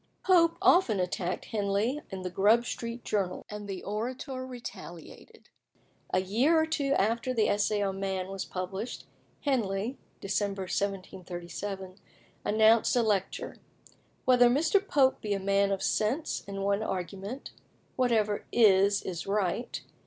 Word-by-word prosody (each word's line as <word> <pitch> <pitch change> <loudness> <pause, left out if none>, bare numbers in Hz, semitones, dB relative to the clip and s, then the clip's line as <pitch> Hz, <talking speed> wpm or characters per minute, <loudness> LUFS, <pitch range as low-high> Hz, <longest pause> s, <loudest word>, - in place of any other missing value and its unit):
Pope 335 -3 +4
often 245 - +5
attacked 180 0 -2
Henley 210 +6 -1
in 190 -2 -6
the 180 - -4
Grub 215 +6 +4
Street 235 0 -5
Journal, 190 -4 -1
and 210 -1 -6
the 195 -2 -5
Orator 255 +5 -4
retaliated. 235 -9 -10 0.6
A 185 - +2
year 245 - +3
or 315 - +3
two 290 -3 0
after 230 +4 +1
the 220 -2 +3
Essay 205 0 +1
on 195 -1 -2
Man 190 -1 -2
was 195 -1 -4
published, 190 +5 -5 0.4
Henley 230 -3 -1 0.2
(Dec. 195 +2 -1 0.2
1737) 190 0 -4 0.5
announced 220 +2 +4
a 240 - +3
lecture, 205 -4 -1 0.7
"Whether 245 -1 +6
Mr. 315 +10 +3
Pope 270 -5 +3
be 205 -1 -1
a - - -2
man 200 +1 +2
of 195 - -1
sense, 245 +9 0
in 195 0 -4
one 200 +1 +1
argument 195 +5 -5 0.4
'Whatever 220 -5 +1
is 200 -2 +4
is 175 -2 -5
right. 200 +3 -1
205 Hz, 135 wpm, -29 LUFS, 195-245 Hz, 0.7 s, Whether